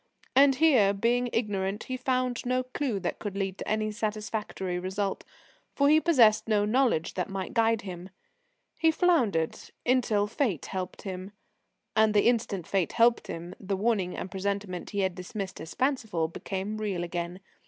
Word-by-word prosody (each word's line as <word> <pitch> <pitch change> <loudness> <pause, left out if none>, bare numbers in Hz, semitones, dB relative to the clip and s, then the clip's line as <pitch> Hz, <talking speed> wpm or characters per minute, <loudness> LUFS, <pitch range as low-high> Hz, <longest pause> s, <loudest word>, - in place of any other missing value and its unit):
And 275 0 +6
here, 255 -10 +5
being 240 +4 +1
ignorant, 205 -3 -1
he 255 - -4
found 255 -1 -1
no 255 +1 0
clue 255 -4 -2
that 175 - -3
could 200 -2 -5
lead 195 -1 -2
to - - -6
any 215 0 0
satisfactory 210 -4 -3
result, 190 +2 -2 0.5
for 280 0 +4
he 310 +1 +6
possessed 235 -12 +5
no 210 -2 +2
knowledge 230 -7 +2
that 180 0 -2
might 195 -1 -4
guide 225 -1 +2
him. 180 -1 -7 0.7
He 325 - +5
floundered 250 - +2 0.3
until 240 -5 +2
Fate 220 - -1
helped 185 -1 -5
him. 190 0 -6 0.6
And 220 -1 +4
the 205 - +4
instant 220 -7 0
Fate 190 -1 0
helped 235 0 +3
him, 170 +2 -6
the 195 -1 -2
warning 200 -4 0
and 185 - -5
presentiment 195 -1 -3
he 200 -1 -1
had 190 -1 +1
dismissed 190 +2 -6
as 160 - -8
fanciful, 225 - 0
became 195 +5 -4
real 200 -5 -2
again. 175 +1 -4
210 Hz, 165 wpm, -28 LUFS, 190-240 Hz, 0.7 s, And